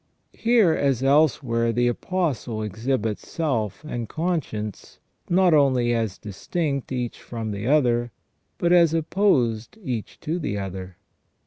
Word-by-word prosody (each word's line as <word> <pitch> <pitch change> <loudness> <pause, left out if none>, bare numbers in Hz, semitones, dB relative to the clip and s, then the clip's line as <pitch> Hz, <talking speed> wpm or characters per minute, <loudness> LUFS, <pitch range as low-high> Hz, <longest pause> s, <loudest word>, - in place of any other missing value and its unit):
Here, 225 -8 +3
as 135 -4 +1
elsewhere, 135 -5 +3
the 120 +1 +2
Apostle 125 -6 -2
ex 110 +3 -7
hibits 110 -6 0
self 130 - -2
and 120 -7 -5
conscience 155 - -3 0.3
not 180 -1 +4
only 130 -5 +3
as 110 -4 -1
distinct 140 - -3
each 125 -2 -3
from 115 -2 -5
the 100 +2 -4
other, 120 -5 +2 0.5
but 175 0 +2
as 170 -2 +5
opposed 150 - +1
each 120 - -4
to 165 +4 -2
the 145 -10 -2
other. 95 -2 -6
125 Hz, 130 wpm, -24 LUFS, 110-160 Hz, 0.5 s, as